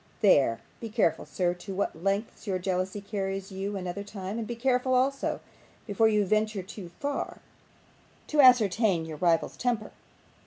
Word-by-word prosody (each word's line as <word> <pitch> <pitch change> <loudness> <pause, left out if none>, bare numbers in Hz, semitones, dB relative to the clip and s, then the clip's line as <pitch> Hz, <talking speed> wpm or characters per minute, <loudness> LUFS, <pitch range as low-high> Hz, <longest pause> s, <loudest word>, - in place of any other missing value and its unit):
There. 140 - +4 0.2
Be 230 - -6
careful, 210 -7 +1
sir, 175 -1 0
to 185 +2 -8
what 185 -4 -2
lengths 200 +3 -2
your 190 -2 0
jealousy 185 +2 -2
carries 195 -1 -4
you 195 +1 -3
another 185 +1 -4
time; 200 +1 -5
and 225 - -4
be 240 - -4
careful, 255 +1 +1
also, 270 +2 +1 0.4
before 220 +1 +3
you 210 -2 +3
venture 215 0 0
too 185 -1 -9
far, 285 0 -3 0.9
to 300 -1 +3
ascertain 220 -8 +5
your 160 -1 -7
rival's 165 0 +1
temper. 235 -4 -1
200 Hz, 155 wpm, -28 LUFS, 185-225 Hz, 0.9 s, ascertain